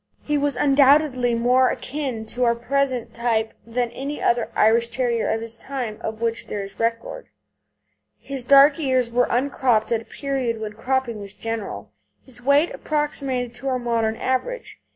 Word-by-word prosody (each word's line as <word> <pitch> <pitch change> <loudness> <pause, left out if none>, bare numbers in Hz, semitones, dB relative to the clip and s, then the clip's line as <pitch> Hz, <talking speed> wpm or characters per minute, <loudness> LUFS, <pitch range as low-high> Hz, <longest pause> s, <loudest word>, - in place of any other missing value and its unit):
He 295 - -1
was 290 0 +1
undoubtedly 275 -3 +4
more 250 +2 +3
akin 260 -6 -4
to 245 +3 -2
our 235 -1 +3
present 250 -1 -1
type 230 -2 0
than 240 0 -1
any 275 +4 -5
other 235 -1 +1
Irish 230 +2 +4
Terrier 235 -1 -1
of 225 - -1
his 230 0 -6
time 250 -6 -5
of 220 +1 -5
which 230 -1 -1
there 205 -1 -4
is 195 0 -11
record. 230 0 -2 0.9
His 270 -2 -5
dark 280 +3 +6
ears 260 -5 +1
were 245 +1 +2
uncropped 245 -3 +1
at 230 -1 +1
a - - -15
period 265 -5 -3
when 215 -1 -5
cropping 255 -1 -1
was 200 0 -6
general; 225 -1 -5 0.3
his 245 -2 -15
weight 280 +6 +3
approximated 275 -5 -2
to 270 - -6
our 260 -1 +1
modern 230 -2 0
average. 260 - -3
245 Hz, 165 wpm, -23 LUFS, 230-275 Hz, 0.9 s, dark